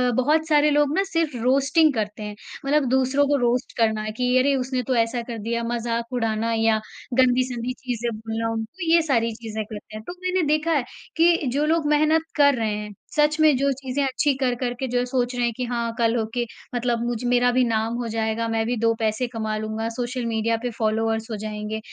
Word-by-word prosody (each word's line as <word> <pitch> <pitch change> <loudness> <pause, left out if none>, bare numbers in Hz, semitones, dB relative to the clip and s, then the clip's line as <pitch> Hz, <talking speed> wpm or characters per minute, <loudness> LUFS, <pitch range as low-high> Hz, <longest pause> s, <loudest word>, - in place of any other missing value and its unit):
बहुत 305 +5 +2
सारे 300 -1 +4
लोग 295 0 +3
ना 390 - +3
सिर्फ 330 -7 -1
रोस्टिंग 275 +4 +3
करते 215 -1 -3
हैं, 210 0 -6 0.3
मतलब 290 0 +2
दूसरों 265 +2 +2
को 290 - +2
रोस्ट 245 0 0
करना 220 -2 +2
है 215 - -3
कि 250 +3 +1
अरे 275 +1 +3
उसने 255 0 -1
तो 255 +2 -1
ऐसा 230 +1 +1
कर 230 -1 -6
दिया, 235 +2 -2
मजाक 235 +1 -2
उड़ाना 225 -1 0
या 225 -1 +2 0.4
गंदी-संदी 250 -1 +2
चीज़ें 240 -2 -3
बोलना 225 +1 -3
उनको 325 +10 -3
ये 335 - +6
सारी 230 -7 +1
चीज़ें 220 -1 -5
करते 215 0 -10
हैं। 215 - -7
तो, 355 - -7
मैंने 370 0 +1
देखा 310 +2 +1
है, 290 -5 +2 0.3
कि 335 +1 +5 0.2
जो 295 +2 +1
लोग 320 0 +1
मेहनत 310 +2 +3
कर 285 -2 +5
रहे 220 -3 -1
हैं 210 0 -6 0.2
सच 300 +1 +3
में 310 -3 +5
जो 275 +1 +2
चीज़ें 270 +1 -2
अच्छी 275 +2 +1
कर 250 -2 +1
कर 245 0 -2
के 265 - -2
जो 245 0 0
सोच 250 -1 -1
रहे 245 - 0
हैं 235 - +1
कि 250 - -2
हाँ, 235 -1 -2
कल 230 -1 +2
होके 230 +1 -1 0.3
मतलब 240 -1 0
मुझ 240 0 -2
मेरा 245 0 +3
भी 255 +1 +3
नाम 225 0 0
हो 240 -1 -3
जाएगा, 225 0 -1
मैं 225 0 0
भी 245 - 0
2 230 +1 +2
पैसे 220 +3 0
कमा 220 -2 -3
लूँगा, 220 +1 -3
सोशल 245 +1 -3
मीडिया 225 0 0
पे 245 - -1
फॉलोवर्स 225 +1 0
हो - - -2
जाएँगे। 215 +1 -4
245 Hz, 215 wpm, -23 LUFS, 225-275 Hz, 0.4 s, ये